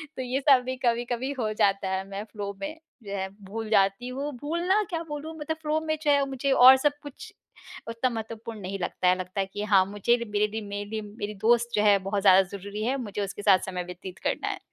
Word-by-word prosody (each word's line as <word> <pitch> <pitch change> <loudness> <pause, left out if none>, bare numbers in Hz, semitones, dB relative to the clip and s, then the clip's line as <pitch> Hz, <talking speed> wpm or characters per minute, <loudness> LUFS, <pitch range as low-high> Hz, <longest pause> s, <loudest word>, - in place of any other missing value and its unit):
तो - - -4
ये 255 +1 -1
सब 265 -2 +7
भी 255 0 -2
कभी-कभी 240 +2 0
हो 220 -3 0
जाता 200 -2 +1
है 190 0 -1
मैं 200 +1 -5
फ़्लो 205 -2 -6
में 300 +2 -4 0.3
जो 200 -1 -5
है 190 0 -2 0.2
भूल 220 +1 -5
जाती 195 +3 +2
हूँ। 275 +4 -4
भूलना 345 +7 +1
क्या 335 -2 -3
बोलूँ 295 +2 -6
मतलब 315 +2 -3
फ़्लो 305 +1 +1
में 310 0 0
जो 295 - +3
है 280 -1 +3
मुझे 270 +1 -1
और 260 0 +9
सब 290 0 +2
कुछ 290 -2 -10 0.5
उतना 230 +3 -1
महत्वपूर्ण 225 -1 -6
नहीं 195 +1 -5
लगता 180 0 -1
है। 180 0 +4
लगता 185 +2 -5
है 195 - +1
कि 205 - -3
हाँ, 195 -3 +4
मुझे 205 +4 +1
र - - -8
मेरे 210 0 +2
लिए 220 +1 -5
मे 205 0 -5
लिए 215 +1 -4
मेरी 210 0 -6
दोस्त 235 +1 +3
जो 210 - +3
है 205 -1 +6
बहुत 200 0 0
ज़्यादा 190 -1 +7 0.2
ज़रूरी 200 +2 -6
है। 260 +3 0
मुझे 210 -5 -4
उसके 200 +1 -6
साथ 195 -2 +5
समय 180 -1 -3
व्यतीत 180 +1 -9
करना - - -2
है। - - -3
220 Hz, 235 wpm, -27 LUFS, 200-260 Hz, 0.5 s, और